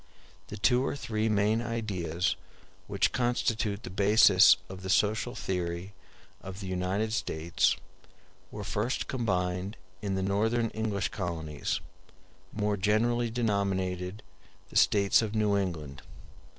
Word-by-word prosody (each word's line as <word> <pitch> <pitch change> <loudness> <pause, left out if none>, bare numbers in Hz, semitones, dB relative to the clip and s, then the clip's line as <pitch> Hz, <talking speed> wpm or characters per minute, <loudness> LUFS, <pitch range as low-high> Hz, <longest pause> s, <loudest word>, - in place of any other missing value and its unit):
The 105 - -7
two 125 +5 +3
or 135 - -1
three 110 -5 -1
main 105 +2 +2
ideas 95 -8 -1 0.5
which - - +1
constitute 115 -3 0
the 120 - -7
basis 100 -1 +6
of 95 0 -9
the 95 - -6
social 110 +5 +1
theory 90 +1 -3 0.5
of 95 0 -8
the 100 - -6
United 95 +4 -1
States 85 -6 +1 0.7
were - - -7
first 125 - -2
combined 95 -4 -1 0.2
in 100 -2 -2
the 95 - -1
Northern 110 +4 +1
English 110 -3 -1
colonies, 85 -8 -3 0.7
more 105 -1 -1
generally 115 +4 +1
denominated 100 -4 -1 0.5
the - - -14
States 100 0 +4
of 110 -1 -3
New 105 -2 +2
England. 80 -8 -3
100 Hz, 125 wpm, -29 LUFS, 95-110 Hz, 0.7 s, basis